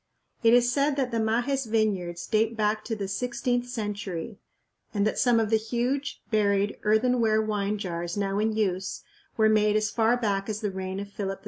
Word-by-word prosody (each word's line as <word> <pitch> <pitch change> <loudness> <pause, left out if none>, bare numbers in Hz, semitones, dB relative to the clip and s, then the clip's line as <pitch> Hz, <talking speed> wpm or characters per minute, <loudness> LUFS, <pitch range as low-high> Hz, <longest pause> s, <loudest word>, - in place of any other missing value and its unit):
It 230 0 +6
is 245 0 +4
said 280 +2 +1
that 265 -3 -1
the 230 - 0
Majes 240 +4 0
vineyards 195 -6 0
date 225 +1 +1
back 215 0 +1
to 225 - -2
the 200 -2 -4
sixteenth 245 +3 -1
century, 205 -7 -5 0.6
and 200 0 +2
that 215 - 0
some 240 -2 +4
of 220 -1 0
the 220 - +5
huge, 245 +5 -2
buried, 205 -1 +1
earthenware 220 0 +3
wine 210 -1 -1
jars 175 -2 -4
now 200 0 0
in 220 +1 +1
use 190 -4 -2 0.3
were 220 -1 +5
made 210 -1 +3
as 215 0 +1
far 230 +1 +2
back 200 -3 -1
as 215 +1 -3
the 210 -2 -1
reign 190 0 -4
of 200 - -5
Philip 195 -1 -4
II. - - -26
215 Hz, 195 wpm, -27 LUFS, 200-235 Hz, 0.6 s, It